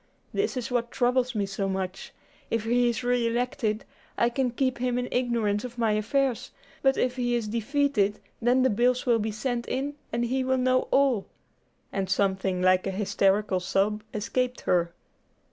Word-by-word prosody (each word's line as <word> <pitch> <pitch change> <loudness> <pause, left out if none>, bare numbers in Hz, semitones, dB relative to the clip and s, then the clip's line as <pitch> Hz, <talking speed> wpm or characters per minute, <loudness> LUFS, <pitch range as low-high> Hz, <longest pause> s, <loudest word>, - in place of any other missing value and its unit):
This 405 -9 0
is 250 0 -4
what 240 -1 0
troubles 250 0 +1
me 205 -2 +1
so 195 0 -2
much. 190 0 -4 0.4
If 230 -1 0
he 240 +1 +3
is 235 +1 -2
re 245 -1 +2
elected, 235 -2 -1 0.3
I 235 - +3
can 255 +1 0
keep 255 +1 -1
him 250 0 0
in 250 0 -1
ignorance 230 -5 0
of 245 -1 -7
my 225 -2 +2
affairs; 240 +4 0 0.3
but 270 0 +3
if 250 0 0
he 245 -1 +1
is 230 -3 -1
defeated, 230 -2 +1 0.2
then 245 +2 +3
the 260 - +3
bills 245 +4 +2
will 235 -2 +3
be 220 +1 -1
sent 235 +2 -3
in, 280 +2 -2 0.2
and 235 +1 0
he 260 +2 0
will 260 0 +1
know 255 0 +2
all;" 270 -7 +2 0.7
and 195 -2 -2
something 190 -1 0
like 185 +1 +4
a - - 0
hysterical 195 0 +1
sob 200 +3 0
escaped 250 +4 -2
her. 170 -1 +1
235 Hz, 180 wpm, -27 LUFS, 210-250 Hz, 0.7 s, like